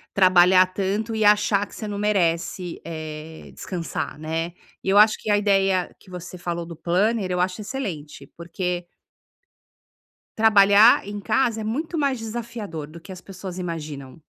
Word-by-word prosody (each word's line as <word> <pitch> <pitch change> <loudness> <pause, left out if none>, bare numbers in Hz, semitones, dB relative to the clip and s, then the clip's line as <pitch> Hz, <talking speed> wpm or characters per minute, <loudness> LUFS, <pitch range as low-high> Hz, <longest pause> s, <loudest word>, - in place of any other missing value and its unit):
trabalhar 185 -1 +6
tanto 200 +4 -2
e 220 -1 0
achar 205 -1 +3
que - - -14
você 215 - -6
não 205 - -4
merece, 180 -3 -1
eh, 155 -1 -8
descansar, 175 -5 -5
né. 165 +2 -3 0.3
E, - - -10
eu 195 +1 +4
acho 215 +1 +6
que - - -6
a 205 - +4
ideia 195 -3 +1
que - - -19
você 180 0 -8
falou 170 -1 -4
do 170 - -9
planner, 190 +5 0
eu 180 - 0
acho 185 +3 -1
excelente, 185 - -6
porque 175 +1 -4 1.5
Trabalhar 210 0 +6
em 205 - -5
casa 225 0 +1
é - - -4
muito 305 +10 -3
mais 275 -4 0
desafiador, 220 -8 -6
do 165 +2 -12
que 175 - -17
as 185 0 -9
pessoas 185 -1 -8
imaginam. 155 -5 -6
190 Hz, 160 wpm, -23 LUFS, 170-210 Hz, 1.5 s, trabalhar